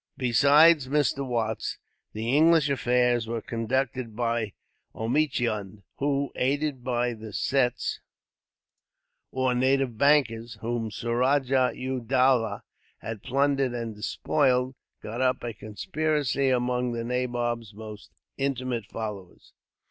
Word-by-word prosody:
Besides 140 +4 +5
Mr. 140 -1 +1
Watts, 115 -4 -2 0.4
the 115 +4 -1
English 160 -1 +5
affairs 125 -3 +2
were 115 0 -2
conducted 120 +1 -2
by 115 -3 -1 0.4
Omichund 110 -6 -1
who, 140 0 0
aided 140 0 -1
by 120 -1 0
the 110 -1 -9
Sets, 125 +3 0 1.3
or 130 -1 +1
native 130 -2 +1
bankers, 120 -6 +2
whom 115 -1 -2
Suraja 125 +4 +1
u 130 0 -3
Dowlah 125 -3 +2 0.3
had 110 -2 -7
plundered 135 -1 +1
and 115 -2 -4
despoiled, 130 +4 +1 0.3
got 115 +4 -4
up 130 -1 +1
a 120 -1 -4
conspiracy 140 - -1
among 125 -1 0
the 115 0 -3
nabob's 120 -2 -2
most 110 -1 -10 0.3
intimate 130 -5 -2
followers. 105 -5 -7
125 Hz, 110 wpm, -27 LUFS, 115-135 Hz, 1.3 s, Besides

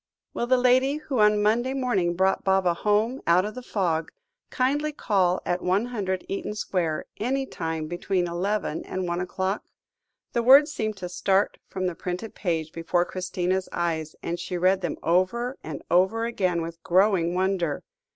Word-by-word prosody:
"Will 240 - -2
the 255 +1 +4
lady 255 +3 +3
who 290 -4 -3
on 210 0 +4
Monday 240 +5 +2
morning 200 -10 0
brought 190 +2 +2
Baba 190 -2 +3
home 210 +8 +1
out 175 +3 +4
of 210 - -4
the 255 - -7
fog, 170 -9 -1 0.4
kindly 290 +4 0
call 190 -10 +1
at 175 0 -1
100, 190 -1 -1
Eaton 200 +1 -4
Square, 170 -6 -1
any 265 +5 -1
time 160 -9 -4
between 175 +2 -1
eleven 180 0 -2
and 185 -1 -3
one 175 +1 -1
o'clock?" 190 +3 -2 0.7
The 235 - +2
words 275 +5 +7
seemed 215 -2 -2
to 180 -2 -5
start 190 +2 +1
from 185 -1 -3
the 180 - 0
printed 180 +6 -5
page 160 -4 -2
before 170 +2 0
Christina's 185 0 -2
eyes, 160 -2 -2
and 170 +1 -3
she 180 - -4
read 185 +2 +3
them 175 - -3
over 235 +9 +1
and 155 -3 -6
over 190 +6 +3
again 185 -7 0
with 165 0 -8
growing 180 -2 +3
wonder. 185 -4 0
190 Hz, 165 wpm, -25 LUFS, 175-225 Hz, 0.7 s, words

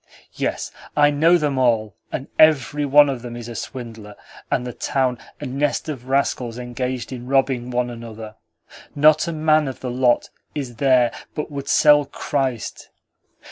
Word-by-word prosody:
Yes, - - -3 0.3
I 145 0 +5
know 165 +4 +4
them 145 -4 -1
all, 110 -6 +1 0.2
and 135 - -4
every 150 -1 +4
one 145 +1 +6
of 135 -3 -3
them 120 -1 -7
is 120 -1 -7
a 120 - -7
swindler, 115 -3 -8 0.3
and 125 - 0
the 125 - -5
town 130 -1 -1 0.2
a 145 - -6
nest 140 +4 -1
of 130 -4 -6
rascals 130 -3 0
engaged 125 +1 -4
in 125 -1 -8
robbing 130 -2 +1
one 125 0 -1
another. 115 -2 -9 0.6
Not 155 +3 +5
a - - -1
man 155 -1 +2
of 130 - -6
the 125 - -3
lot 125 -1 +1 0.2
is 130 -6 -5
there 130 -2 +4 0.2
but 150 0 -4
would 140 -1 -6
sell 145 0 +5
Christ. 135 -4 -3
130 Hz, 165 wpm, -21 LUFS, 120-145 Hz, 0.6 s, one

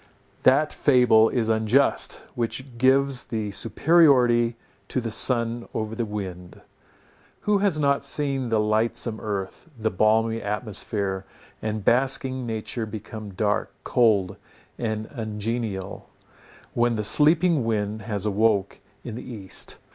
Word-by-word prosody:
That 145 +4 +3
fable 125 -5 +4
is 120 -3 -1
unjust, 110 +5 +2
which 120 +1 -5
gives 135 0 +3
the 110 -3 -4
superiority 120 -3 +3 0.3
to - - -2
the 115 -2 -4
sun 115 0 +1
over 110 0 -3
the 115 0 -2
wind. 95 -4 -7 0.8
Who 210 -1 +1
has 195 -5 +1
not 140 -2 +1
seen 140 -3 -1
the 110 -1 +2
lightsome 110 +1 0
earth, 100 - -5
the 110 0 -1
balmy 110 +3 +2
atmosphere, 100 -2 -3 0.4
and 110 -2 -4
basking 130 0 +1
nature 110 0 -4
become 105 -1 -8
dark, 105 +1 0
cold 100 -5 +2 0.4
and 110 -2 -2
ungenial, 110 -4 -4 0.6
when 120 0 +1
the 105 - -2
sleeping 155 - +5
wind 110 -1 -2
has 105 -1 -3
awoke 105 -1 +1 0.2
in 120 - -7
the 125 +2 -8
east? 100 -5 -3
115 Hz, 125 wpm, -24 LUFS, 105-130 Hz, 0.8 s, sleeping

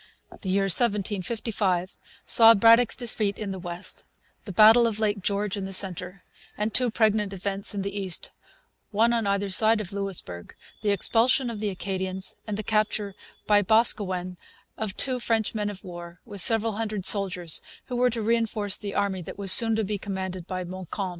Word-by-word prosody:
The 190 - -4
year 195 +1 +1
1755 200 -2 -1 0.3
saw 230 0 +7
Braddock's 230 +3 +4
Defeat 220 -4 -1
in 210 -3 -5
the 190 - -6
west, 175 +1 -8 0.4
the 200 - -6
battle 220 +5 +6
of 220 -2 -3
Lake 205 -2 -1
George 200 +1 -2
in 200 -2 -5
the 195 - -6
centre, 185 0 0 0.3
and 210 +1 -2
two 250 -1 +3
pregnant 215 -2 0
events 195 +1 -2
in 195 - -3
the 200 0 -5
east, 190 -4 -1 0.6
one 230 +3 +2
on 230 -3 -1
either 200 0 -1
side 220 +3 +4
of 200 -2 -6
Louisbourg 195 - -3 0.3
the 215 - -1
expulsion 235 +5 +2
of 220 - -7
the 210 -1 -2
Acadians, 190 0 -4
and 210 -1 -4
the 215 - -4
capture 215 -1 -1 0.3
by 205 -1 +3
Boscawen 190 -4 +1 0.4
of 215 -3 -5
two 255 -2 +1
French 225 -2 -1
men 210 -2 -2
of 200 -1 -9
war 175 -1 -10
with 205 -5 -2
several 225 0 +2
hundred 215 -4 -4
soldiers 185 -5 +3 0.2
who 250 - -6
were 250 +1 +2
to 230 -2 -4
reinforce 220 -3 0
the 200 -2 -7
army 200 -2 -1
that 165 - -9
was 195 -2 +2
soon 225 +1 +7
to 220 - -1
be 205 0 -4
commanded 190 -3 -6
by 185 -1 -4
Montcalm. 185 +2 -6
205 Hz, 180 wpm, -25 LUFS, 190-220 Hz, 0.6 s, saw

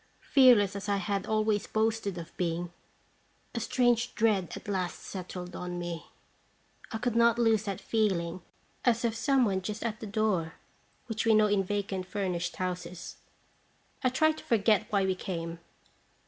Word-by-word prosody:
Fearless 240 -8 +6
as 200 +1 -5
I 200 - +2
had 195 +1 -2
always 215 -1 +1
boasted 220 -3 0
of 170 -1 -8
being, 175 0 -2 0.8
a 235 - -2
strange 240 +1 +1
dread 210 -6 +2
at - - -10
last 185 -3 -2
settled 180 -1 -7
on 180 0 -4
me. 175 -1 -5 0.8
I 220 - -2
could 240 0 -1
not 235 0 +5
lose 225 -3 +3
that 200 -2 -3
feel 205 -2 +1
ing 170 +2 -5 0.4
as 235 -1 +2
of 230 - +1
some 265 +2 +3
one 190 -3 0
just 210 +3 -4
at 225 -2 -3
the 220 - -6
door, 200 -6 0 0.5
which 225 -3 -2
we 225 -1 +5
know 215 0 +6
in 205 -2 +2
vacant 195 -1 -2
furnished 180 -4 -2
houses. 180 -1 -5 0.9
I 255 - +4
tried 315 +5 +2
to - - -12
forget 215 -2 +3
why 200 -2 +2
we 190 - +2
came. 170 -3 -5
205 Hz, 165 wpm, -30 LUFS, 180-225 Hz, 0.9 s, Fearless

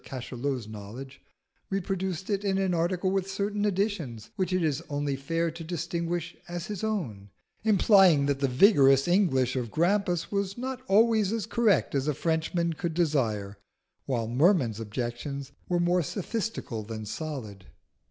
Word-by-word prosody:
Cachalot's 125 -1 -4
knowledge, 110 +6 -9 0.5
reproduced 190 -1 -2
it 200 0 0
in 195 -1 +1
an 190 -2 +1
article 175 +2 0
with 195 0 -1
certain 205 +2 -1
additions, 185 - -2
which 190 -3 -1
it 185 -1 +1
is 155 -1 0
only 145 -1 -1
fair 165 +5 -1
to 165 +1 -8
distinguish 170 0 -3
as 175 0 -5
his 205 0 -5
own, 130 - -3 0.3
implying 195 -8 +5
that 140 -1 0
the 135 - +2
vigorous 135 - +5
English 145 -10 +2
of 125 -3 -2
Grampus 175 - +1
was 200 0 -1
not 255 +1 -4
always 215 0 +4
as 225 -4 -1
correct 220 -8 +2
as 140 0 0
a 150 - +1
Frenchman 165 +2 0
could 160 0 -4
desire, 110 - 0 0.5
while 120 -4 -1
Merman's 125 - +3
objections 120 +5 -4 0.2
were 175 -1 +2
more 175 +1 +3
sophistical 200 - -3
than 110 0 -6
solid. 110 - -6
165 Hz, 150 wpm, -28 LUFS, 130-195 Hz, 0.5 s, implying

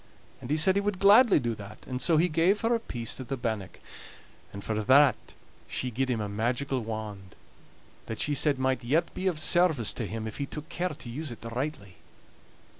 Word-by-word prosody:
And 125 - -8
he 150 - +1
said 175 +5 +4
he 200 - +1
would 205 -1 -1
gladly 205 +2 +6
do 120 -3 -2
that, 105 0 -11
and 130 0 -4
so 165 +4 +3
he 170 +3 +4
gave 175 +5 +2
her 230 +1 +2
a 230 - +1
piece 120 - -4
of 130 - -7
the 135 - -3
bannock; 110 -5 -4 0.7
and 100 0 -8
for 110 - -2
that 135 +4 +6 0.5
she 125 - -3
gied 130 +3 -1
him 120 -3 0
a 105 - -2
magical 120 +6 -1
wand, 105 -4 -7 0.7
that 110 - -5
she 150 - 0
said 145 0 +3
might 130 -1 0
yet 155 +8 0
be 190 - -3
of 170 -5 0
service 160 - +3
to 115 - -4
him 110 +3 -5
if 110 - -7
he 140 - -2
took 150 +2 -8
care 180 +1 -2
to 145 -6 -9
use 145 +6 -5
it 115 - -10
rightly. 115 - -5
130 Hz, 210 wpm, -28 LUFS, 115-160 Hz, 0.7 s, gladly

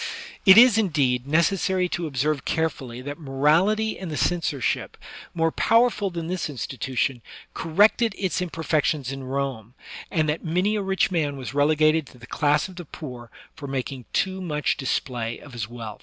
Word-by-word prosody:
It 190 +2 +10
is, 235 -2 +8
indeed, 140 - +1
necessary 180 +4 +2
to 175 -1 -2
observe 145 0 -1
carefully 130 -6 -2
that 145 +2 -6
morality 165 +10 +2
and 185 - -6
the 155 - -4
censorship, 165 -6 -1 0.4
more 165 -1 +2
powerful 230 -2 +2
than 170 -2 -5
this 175 -2 -3
institution, 130 -1 -2 0.3
corrected 205 +6 +3
its 185 -2 -1
imperfections 155 -5 -1
in 135 -1 -6
Rome, 130 -4 -4 0.3
and 155 -2 +1
that 150 +2 -2
many 180 +6 +1
a 210 - 0
rich 190 0 +1
man 150 -5 -1
was 130 -1 -6
relegated 155 +1 +3
to 125 - -16
the 120 - -12
class 150 +5 +1
of 185 -2 -14
the 175 - -7
poor 125 -6 -9 0.2
for 145 -3 -8
making 135 -1 -4
too 190 0 -1
much 150 -7 -1
display 120 -3 -2
of 145 - -14
his 115 -3 -4
wealth. 115 -3 -8
155 Hz, 165 wpm, -24 LUFS, 135-180 Hz, 0.4 s, It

